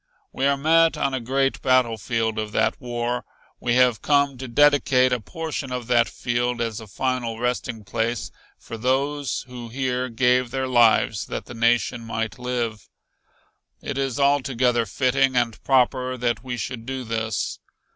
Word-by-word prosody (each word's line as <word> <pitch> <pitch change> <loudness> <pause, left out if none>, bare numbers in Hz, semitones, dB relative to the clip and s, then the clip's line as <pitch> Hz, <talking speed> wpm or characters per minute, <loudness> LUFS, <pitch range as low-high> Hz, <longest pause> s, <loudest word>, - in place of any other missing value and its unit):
We 135 - +1
are 140 0 +2
met 165 +3 +4
on 140 -1 0
a 130 - 0
great 135 +3 0
battlefield 115 -3 +1
of 105 -1 -4
that 110 - +1
war. 120 0 -2 0.4
We 120 0 0
have 125 -4 +4
come 140 -2 +2
to 130 - -5
dedicate 130 -1 +4
a 125 - 0
portion 155 +3 -5
of 125 -1 -3
that 120 -1 +3
field 120 0 -1
as 115 -3 -2
a 110 - -11
final 120 +1 -2
resting 120 -2 -2
place 115 +2 -2 0.3
for 115 - -9
those 135 +3 0
who 120 -2 -8
here 130 0 -2
gave 125 +1 +2
their 130 +1 -2
lives 115 -3 +3
that - - -5
the - - -10
nation 120 0 +1
might 115 +1 -4
live. 120 -4 -3 0.9
It 140 -1 -4
is 135 -1 -2
altogether 130 -4 +2
fitting 130 +4 +1
and 120 -2 0
proper 130 -1 +2
that 120 -1 -1
we 125 -2 -4
should 120 -2 -5
do 130 -1 -4
this. 110 -2 -2
125 Hz, 160 wpm, -23 LUFS, 115-130 Hz, 0.9 s, met